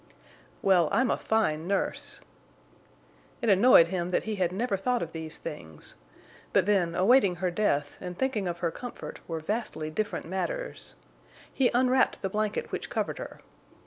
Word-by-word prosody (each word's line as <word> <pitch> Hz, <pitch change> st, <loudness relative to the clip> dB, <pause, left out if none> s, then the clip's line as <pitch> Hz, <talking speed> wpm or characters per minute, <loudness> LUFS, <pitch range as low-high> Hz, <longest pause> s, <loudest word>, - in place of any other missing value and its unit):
"Well, 180 Hz, -5 st, +4 dB
I'm 245 Hz, +4 st, +2 dB
a -, -, +3 dB
fine 170 Hz, -8 st, 0 dB
nurse!" 200 Hz, +1 st, -2 dB, 1.2 s
It 235 Hz, -, 0 dB
annoyed 195 Hz, -4 st, +7 dB
him 180 Hz, -1 st, -2 dB
that 180 Hz, -, 0 dB
he 215 Hz, -1 st, -3 dB
had 180 Hz, -2 st, +1 dB
never 210 Hz, +3 st, -1 dB
thought 245 Hz, +4 st, 0 dB
of 165 Hz, -, -6 dB
these 160 Hz, -1 st, -6 dB
things. 80 Hz, -, -9 dB, 0.6 s
But 195 Hz, -3 st, +4 dB
then, 185 Hz, -5 st, +2 dB
awaiting 195 Hz, 0 st, +4 dB
her 180 Hz, 0 st, -1 dB
death 145 Hz, -7 st, 0 dB
and 180 Hz, -1 st, -6 dB
thinking 225 Hz, -7 st, -1 dB
of 175 Hz, -1 st, -3 dB
her 170 Hz, -2 st, 0 dB
comfort 245 Hz, +6 st, -8 dB
were 165 Hz, -1 st, -3 dB
vastly 160 Hz, -4 st, -3 dB
different 215 Hz, +6 st, -2 dB
matters. -, -, -4 dB, 0.6 s
He 260 Hz, -2 st, +3 dB
unwrapped 255 Hz, -1 st, +3 dB
the 195 Hz, -, 0 dB
blanket 215 Hz, +1 st, -2 dB
which -, -, -4 dB
covered -, -, -2 dB
her. -, -, -8 dB
190 Hz, 160 wpm, -28 LUFS, 170-220 Hz, 1.2 s, annoyed